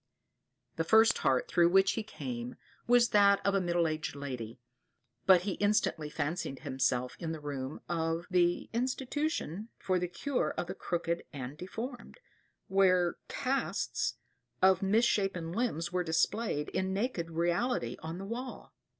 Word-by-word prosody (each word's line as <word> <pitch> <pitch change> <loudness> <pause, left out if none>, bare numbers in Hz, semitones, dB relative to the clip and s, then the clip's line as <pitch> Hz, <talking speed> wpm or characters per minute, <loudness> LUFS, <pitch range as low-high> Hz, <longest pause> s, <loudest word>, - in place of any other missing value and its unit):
The 165 - +1
first 220 +6 +5
heart 130 -2 +2
through 170 -1 +4
which 195 +1 +5
he 225 - -2
came, 240 +2 -6 0.3
was 240 0 +5
that 200 -1 +5
of 200 - +3
a 195 - +2
middle 175 -1 +1
aged 155 -2 -3
lady, 125 -5 -6 0.7
but 185 -2 +8
he 195 +2 -2
instantly 205 -7 +1
fancied 150 -2 -3
himself 125 -1 0
in 165 -2 -3
the 160 - -6
room 140 -1 -5
of 165 0 -1
the 175 -1 +2
"Institution 255 - -2
for 185 -1 0
the 180 - -1
cure 270 +9 -2
of - - -1
the 180 - -5
crooked 170 -2 -2
and 135 -1 -6
deformed," 235 - -7 0.5
where 185 -2 +3
casts 275 0 -1 0.4
of 190 -1 +5
mis 210 +5 +3
shapen 190 -7 0
limbs 175 -6 -1
are 180 0 +1
displayed 160 0 0
in 190 0 -1
naked 195 -6 -1
reality 170 - 0
on 160 +2 -6
the 195 - -6
wall. 245 +5 -6
180 Hz, 150 wpm, -31 LUFS, 160-220 Hz, 0.7 s, but